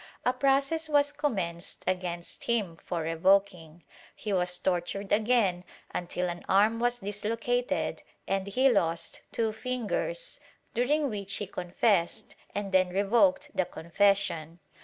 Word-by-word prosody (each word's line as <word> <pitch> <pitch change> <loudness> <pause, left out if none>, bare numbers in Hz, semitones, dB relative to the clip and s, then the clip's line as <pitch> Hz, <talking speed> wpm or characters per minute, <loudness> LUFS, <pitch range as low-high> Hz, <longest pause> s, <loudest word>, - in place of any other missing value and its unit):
A 250 - +3
process 280 +4 +1
was 290 -1 +3
commenced 185 - -2
against 175 -2 -3
him 210 -8 0
for 170 +1 -4
revoking; 170 -1 +1 0.3
he 210 -1 -3
was 180 -1 +1
tortured 190 +2 -2
again, 210 -5 +2 0.3
until 180 +1 -2
an 175 0 -5
arm 210 +4 +4
was 245 +1 +1
dislocated 230 +4 -1 0.3
and 195 0 -1
he 255 +7 +3
lost 170 -9 +1
two 225 -1 0
fingers, 255 - -3 0.3
during 290 +5 +2
which 200 -4 -3
he 205 - -2
confessed 180 +2 0 0.2
and 200 -1 -3
then 185 -1 +4
revoked 240 +10 +2
the 185 - +1
confession. 170 -2 0
200 Hz, 125 wpm, -29 LUFS, 180-245 Hz, 0.3 s, arm